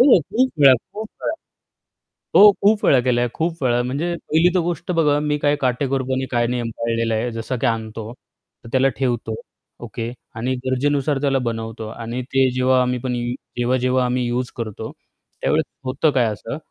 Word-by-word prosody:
हो, 250 -4 +7
खूप 230 - 0
वेळा, 135 -2 +8 0.2
खूप 215 +1 -5
वेळा. - - -1 1.0
हो, 205 +1 +10
खूप 205 +1 +3
वेळा 135 - +5
केलं 120 -1 +1
आहे, 120 - 0
खूप 165 -2 -2
वेळा. 120 -1 +2
म्हणजे 145 +8 -2
पहिली 165 +1 +2
तर 180 - +4
गोष्ट 175 +1 -3
बघा, 150 -4 +3
मी 150 0 0
काय 145 0 +2
काटेकोरपणे 130 0 0
काय 120 -1 +2
नियम 120 -1 -2
पाळलेला 115 -1 0
आहे, 120 +2 -1
जसं 115 +3 -4
की - - +1
आणतो, 110 -1 -3
तर 120 -2 -20
त्याला 130 +1 +3
ठेवतो. 120 -4 -1 0.5
ओके. 115 +1 -5 0.2
आणि 120 +4 -1
गरजेनुसार 140 +2 +1
त्याला 140 -2 +2
बनवतो 115 -1 -4
आणि 115 +2 -5
ते 135 -1 +4
जेव्हा 130 0 +3
आम्ही 125 0 0
पण 125 0 -2
यू 120 0 -2 0.3
जेव्हा-जेव्हा 125 +1 +1
आम्ही 125 0 0
यूज 125 +1 -1
करतो 110 -4 -5 0.5
त्यावेळेस - - +1 0.2
होतं 135 +4 +1
काय 130 -3 +2
असं, 115 +6 -6
130 Hz, 175 wpm, -21 LUFS, 120-145 Hz, 1.0 s, हो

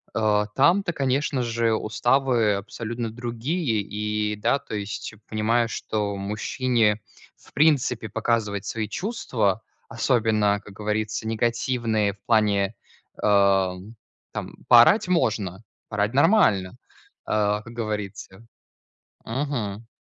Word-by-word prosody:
Э, 105 -1 +2
там-то, 175 +7 +3
конечно 135 -1 0
же, 115 -1 +1
уставы 120 0 +2
абсолютно 115 +3 -5
другие. 120 - -2
И 105 +1 -2
да, 105 +7 +1
то - - -7
есть 105 +1 -5
понимаю, 115 +2 +1
что 105 -2 -2
мужчине, 105 +2 0 0.4
в - - -22
принципе, 135 -7 +2
показывать 105 -2 -1
свои 110 0 -3
чувства, 115 - -1 0.3
особенно, 110 -4 +2
как 100 - -12
говорится, 105 +1 -2
негативные 115 -2 0
в 100 - -24
плане, 105 -2 +2 0.5
э, 100 -2 +4 0.6
там, - - -6
поорать 120 - +7
можно, 110 - 0 0.3
поорать 105 +1 0
нормально, 135 - +4 0.6
э, 105 0 +1
как 115 - -11
говорится. 105 -2 -5 0.8
Мгм. 115 -5 -3
110 Hz, 105 wpm, -24 LUFS, 105-120 Hz, 0.8 s, поорать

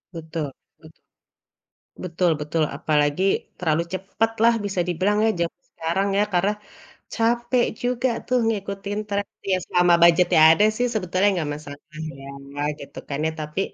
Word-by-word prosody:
Betul 160 -1 -4 0.4
bet - - -15 1.1
betul 175 0 +1
betul, 155 +2 -1
apalagi 150 +1 +1 0.4
terlalu 165 -2 +1
cepet 195 +4 -1
lah 235 0 +6
bisa 195 -2 -1
dibilang 190 +5 +1
ya - - +4
jaman 170 +1 -3
sekarang 170 +5 -1
ya, - - +4
karena 190 +4 +2 0.6
capek 240 +1 +1 0.2
juga 250 +1 +1 0.2
tuh 255 0 +2
ngikutin 200 -1 -3
trend. 200 0 -2 0.2
Ya 185 - +3
selama 175 -1 +3
budget-nya 170 0 +5
ada 205 +6 +4
sih, 245 0 +1
sebetulnya 185 -1 +1
enggak 160 -5 -2
masalah 145 -1 -10 0.4
ya, 135 - -10 0.5
gitu 140 - -11
kan 140 - -3
ya. 160 - -1
Tapi 150 +4 -4
185 Hz, 145 wpm, -23 LUFS, 160-205 Hz, 1.1 s, lah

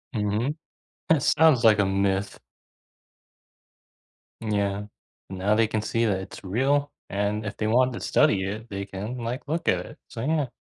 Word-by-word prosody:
Mhm. 110 +7 0 0.5
It 160 -3 +4
sounds 155 -6 +4
like 110 -2 +6
a 100 - +4
myth. 95 0 0 2.0
Yeah. 100 -2 -1 0.4
Now 95 +2 +1
they 110 0 +3
can 110 0 -1
see 115 +2 0
that 100 -4 +1
it's 95 - -10
real, 140 +8 +1 0.2
and 105 +2 -1
if 100 - -5
they 110 - -1
want 125 +3 +3
to - - -5
study 95 -2 +3
it, 110 +4 -6
they 100 0 -4
can, 105 +6 -6
like, 125 +4 -4
look 165 +3 -2
at 90 -1 +2
it. - - -13
So, 115 - -7
yeah. 150 -4 +1
110 Hz, 165 wpm, -25 LUFS, 100-125 Hz, 2.0 s, like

